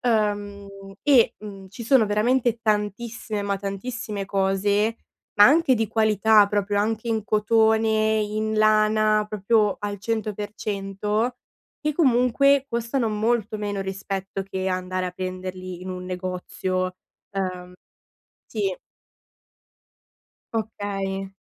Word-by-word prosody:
uhm, 205 -3 0 0.4
e, 275 -6 +5
mhmm, 195 -2 -10
ci 220 +4 -9
sono 255 -1 +5
veramente 230 +3 +1
tantissime, 215 0 -2
ma 200 0 -1
tantissime 200 +1 -4
cose, 200 +3 +1 0.4
ma 205 - +9
anche 290 -1 +4
di 225 -2 -1
qualità 215 -1 +4
proprio 205 0 0
anche 220 +2 -1
in 220 -2 -1
cotone, 220 0 +3
in 215 +1 -2
lana, 215 0 +3
proprio 210 0 +2
al 205 -1 -4
100% 210 +1 -2 0.5
che 300 0 0
comunque 275 -1 +3
costano 235 +1 -1
molto 215 0 0
meno, 205 -1 -3
rispetto 195 0 -4
che 190 0 -3
andare 185 0 -2
a - - -3
prenderli 185 0 -6
in 185 - -7
un 180 0 -6
negozio. 185 0 -3 0.4
Uhm 185 -2 -4 0.7
sì. 200 -4 -2 1.8
Okay. 195 -3 -3
210 Hz, 110 wpm, -24 LUFS, 195-220 Hz, 1.8 s, ma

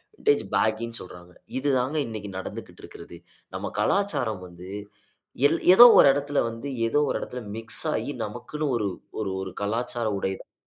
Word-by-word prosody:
Vintage 430 0 +2
பேகின்னு 115 +1 0
சொல்றாங்க. 90 -1 -12 0.2
இது 140 +2 0
தாங்க 130 +5 -1
இன்னைக்கு 110 -3 -6
நடந்துக்கிட்டுருக்கிறது. 90 -2 -9 0.4
நம்ம - - -4
கலாச்சாரம் 195 - 0
வந்து 90 +1 -12 0.8
எல் 165 - 0
ஏதோ 235 +6 +11
ஒரு - - +8
இடத்துல 145 +1 -1
வந்து, 115 +4 -7 0.2
ஏதோ 145 - +2
ஒரு - - 0
இடத்தில 125 - -6 0.2
மிக்ஸ் 115 0 -2
ஆயி - - -2
நமக்குன்னு 120 +8 -5
ஒரு 105 -3 -1 0.3
ஒரு 100 -3 -2
ஒரு 95 0 -5
கலாச்சார 115 +3 -2
உடையதான் 95 0 -5
115 Hz, 145 wpm, -25 LUFS, 100-145 Hz, 0.8 s, ஏதோ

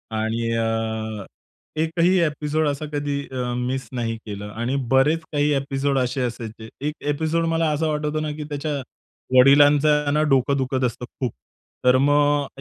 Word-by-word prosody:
आणि 115 +1 -1
अ, 110 -2 -2 0.6
एकही 170 +3 +2
ॲपिसोड 150 0 0
असा 145 +2 -3
कधी 145 -1 -1
अ, 125 -1 -2
मिस 130 +2 -2
नाही 115 -2 -2
केला. 105 -1 -6
आणि 120 +4 -1 0.2
बरेच 140 +5 +4
काही 145 0 +2
ॲपिसोड 135 0 -1
असे 125 +1 -1
असायचे. 115 -2 -5
एक 150 +1 -1
ॲपिसोड 160 +3 0
मला 165 -1 +2
असा 160 +2 0
वाटतो 150 0 -1
ना 155 -1 -2
की 155 - -5
त्याच्या 145 0 -3 0.6
वडिलांचं 145 +2 +5
ना 150 - +2
डोकं 135 +1 +2
दुखत 130 0 -1
असतं 125 +1 -3
खूप. 125 -1 -4 0.5
तर 125 +1 +6
मग 145 0 +3
140 Hz, 150 wpm, -23 LUFS, 125-150 Hz, 0.6 s, तर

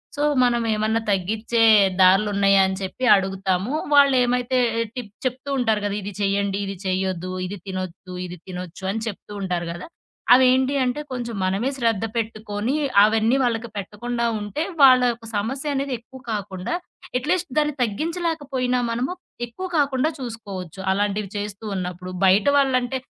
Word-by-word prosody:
So, 290 - -1 0.2
మనం 240 -1 +2
ఏమన్నా 215 +1 +1
తగ్గిచ్చే 215 +5 0 0.4
దారులున్నాయా 195 +1 +5
అని 190 - -2
చెప్పి 190 +7 -5
అడుగుతాము. 190 +2 0 0.2
వాళ్ళేమైతే 255 -3 +4 0.4
టిప్ 225 -5 -6
చెప్తూ 255 +2 -3
ఉంటారు 220 -3 +2
గదా! 205 0 -1
ఇది 200 +1 -6
చేయ్యండి, 200 0 0
ఇది 195 0 -5
చేయొద్దు. 185 -1 -1
ఇది 200 +2 -5
తినొద్దు, 185 -1 -6
ఇది 180 0 -8
తినొచ్చు 180 0 -8
అని 225 - -3
చెప్తూ 210 0 -7
ఉంటారు 175 -2 -2
గదా! 175 - -7 0.5
అవేంటి 260 +2 +4
అంటే, 250 +4 -1
కొంచెం 240 -3 -4
మనమే 200 +8 0
శ్రద్ధ 225 -4 +1
పెట్టుకొని 215 +2 -2 0.3
అవన్నీ 225 +4 +2
వాళ్ళకి 235 -1 -1
పెట్టకుండా 235 +4 -3
ఉంటే, 205 +10 -3 0.2
వాళ్ళ 255 -1 +8
యొక్క 230 0 -10
సమస్యనేది 270 +4 -2
ఎక్కువ 260 +2 -14
కాకుండా, 195 - -3 0.4
అట్‌లీస్ట్ 345 +3 -1
దాన్ని 300 -1 0
తగ్గించలేకపోయినా 285 - -1
మనము, 245 +9 -1 0.3
ఎక్కువ 370 +11 -6
కాకుండా 285 +1 +2
చూసుకోవచ్చు. 200 -7 -7
అలాంటివి 205 0 -1
చేస్తూ 205 +1 -6
ఉన్నప్పుడు. 180 0 -5
బయట 195 +6 +4
వాళ్ళంటే 260 -2 +1
220 Hz, 135 wpm, -23 LUFS, 195-255 Hz, 0.5 s, వాళ్ళ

